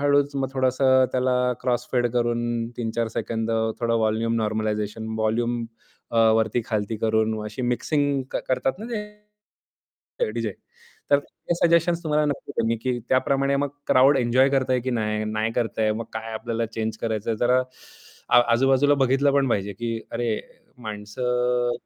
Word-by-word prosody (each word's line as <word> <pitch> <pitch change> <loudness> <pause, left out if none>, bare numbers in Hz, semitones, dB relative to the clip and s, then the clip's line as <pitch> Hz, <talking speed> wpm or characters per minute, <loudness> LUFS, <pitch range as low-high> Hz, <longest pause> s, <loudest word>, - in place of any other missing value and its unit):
हळूच 145 0 +2
मग 135 -1 -1
थोडंसं 130 0 +3
त्याला 130 0 +1 0.3
क्रॉस 125 -1 -1
फेड 120 -1 +2
करून 120 -1 0
3-4 115 -1 -2
सेकंद 115 0 -3 0.3
थोडं 115 -1 +1
व्हॉल्यूम 110 +1 +1
नॉर्मलायझेशन. 110 0 -2
व्हॉल्यूम 115 +2 0 0.5
अ, 115 - -3 0.2
वरती-खालती 110 -1 -1
करून 110 0 +1
अशी 105 +4 -5
मिक्सिंग 140 +3 0
कर - - -1
करतात 130 +5 0
ना 220 - -7 1.3
ते 485 -3 0
डीजे - - -2 0.6
तर 140 - +6
ते 165 +3 -5
सजेशन्स 170 0 +2
तुम्हाला 150 -1 +2
नक्की 145 - -4
त्यांनी 115 0 +1
की 125 -1 -1
त्याप्रमाणे 140 +1 +2
मग 140 0 0 0.2
क्राउड 135 +2 +5
एन्जॉय 125 +2 +3
करतंय 130 -2 +1
की 130 +2 -3
नाही? 110 -2 -1
नाही 110 +1 -1
करतंय, 110 -2 0
मग 115 +1 -4
काय 110 0 -5
आपल्याला 115 +1 -2
चेंज 110 0 -4
करायचंय 110 0 -2
जरा 125 +1 +3 0.7
आ - - +7
आजूबाजूला 135 +3 +4
बघितलं 135 +2 +2
पण 140 -2 +2
पाहिजे 100 -2 -1
की 115 +3 -3
अरे 120 0 -1 0.5
माणसं 120 +3 -1
120 Hz, 145 wpm, -24 LUFS, 110-130 Hz, 1.3 s, आ